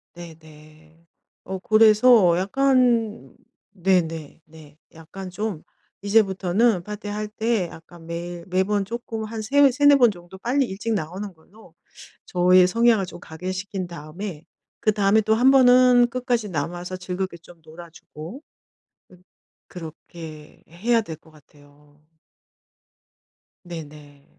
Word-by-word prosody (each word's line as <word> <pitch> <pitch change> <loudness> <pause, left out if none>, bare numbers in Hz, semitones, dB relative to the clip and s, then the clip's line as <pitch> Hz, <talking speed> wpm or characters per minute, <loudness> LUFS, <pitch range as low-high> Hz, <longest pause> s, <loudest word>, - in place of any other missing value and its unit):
네네. 160 -1 -15 0.4
어. 190 0 -6
그래서 215 -2 +5
약간 235 +1 +1 0.4
네네. 170 -5 -1
네. 155 -2 -17 0.2
약간 185 +4 -10
좀 195 -2 -5 0.4
이제부터는 200 0 +2
파티할 210 +1 -5
때 220 -2 -1
약간 165 +1 -14
매일 170 +1 -6
매번 190 +2 0
쪼끔 225 0 -6
한 220 0 -6
세 280 +5 +4
3-4 285 +2 +5
번 240 -4 +5
정도 175 0 -13
빨리 260 +7 0
일찍 225 +1 -4
나오는 190 +2 -4
걸로 180 +3 -20 0.5
저의 180 0 +4
성향을 230 0 +3
좀 175 - -10
각인시킨 185 +3 -6
다음에 170 +1 -8 0.4
그다음에 210 0 +2
또 220 +1 +2
1 250 +4 +5
번은 250 -2 +6
끝까지 240 -3 -2
남아서 175 +3 -4
즐겁게 185 0 -5
좀 170 0 -18
놀아주고 165 - -11 0.7
음 180 0 -19 0.5
그렇게 160 -2 -11
해야 230 +8 +1
될 165 -7 -8
것 160 - -22
같아요. 145 0 -23 1.6
네네. 150 -4 -11
185 Hz, 225 characters per minute, -23 LUFS, 165-220 Hz, 1.6 s, 번은